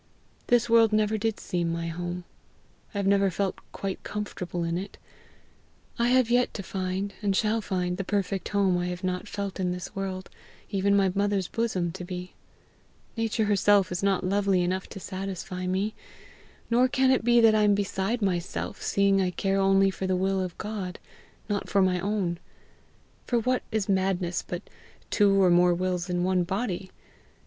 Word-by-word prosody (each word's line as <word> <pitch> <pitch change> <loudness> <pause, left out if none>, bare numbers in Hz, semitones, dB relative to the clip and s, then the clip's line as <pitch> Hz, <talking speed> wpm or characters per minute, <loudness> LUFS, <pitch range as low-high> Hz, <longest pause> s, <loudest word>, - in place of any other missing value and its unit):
This 240 -1 +3
world 230 -1 +5
never 215 0 +2
did 220 0 -1
seem 170 -2 -1
my 170 0 -3
home; 175 +2 -4 0.7
I 205 - -6
have 200 - 0
never 200 0 +4
felt 190 +1 -2
quite 195 -1 -4
comfortable 180 -4 -4
in 165 0 -1
it; 190 +3 -5 1.0
I 235 - +3
have 250 -1 +3
yet 245 +1 +2
to 200 - -4
find, 190 +1 -3
and 200 -2 +1
shall 220 +2 +1
find 180 -2 -2
the 195 - -2
perfect 195 -1 -2
home 195 -3 +2
I 175 - -1
have 180 +1 -5
not 185 +2 -2
felt 200 -2 -4
this 180 0 -3
world, 190 -1 -4 0.4
even 200 0 +2
my 195 -2 +3
mother's 200 -2 0
bosom 190 -7 -1
to 180 +1 -7
be. 180 0 -6 0.8
Nature 225 -1 0
herself 205 -1 +3
is 180 - -2
not 195 -1 +1
lovely 195 -1 +2
enough 185 +1 -2
to - - -8
satisfy 185 -1 -5
me. 195 +4 0 0.8
Nor 245 +2 +5
can 260 0 +3
it 260 - +2
be 240 0 +5
that 225 -1 +6
I 215 - +3
am 205 -1 +4
beside 200 +3 -1
myself, 180 -2 -2
seeing 200 -1 +2
I 185 - +1
care 195 +2 0
only 195 0 +4
for 190 +1 -4
the 185 - +1
will 190 +1 +1
of 180 -2 -5
God, 205 -4 -5 0.5
not 205 -1 -2
for 200 -1 +3
my 180 -1 +2
own. 190 -3 -1 0.9
For 240 - +2
what 250 +2 +1
is 215 -3 0
madness 190 -2 0
but 175 +2 -6 0.5
two 200 -2 +4
or 185 -2 +5
more 175 0 +5
wills 180 0 -2
in 175 0 0
one 185 -1 +2
body? 190 0 -3
195 Hz, 175 wpm, -27 LUFS, 180-205 Hz, 1.0 s, that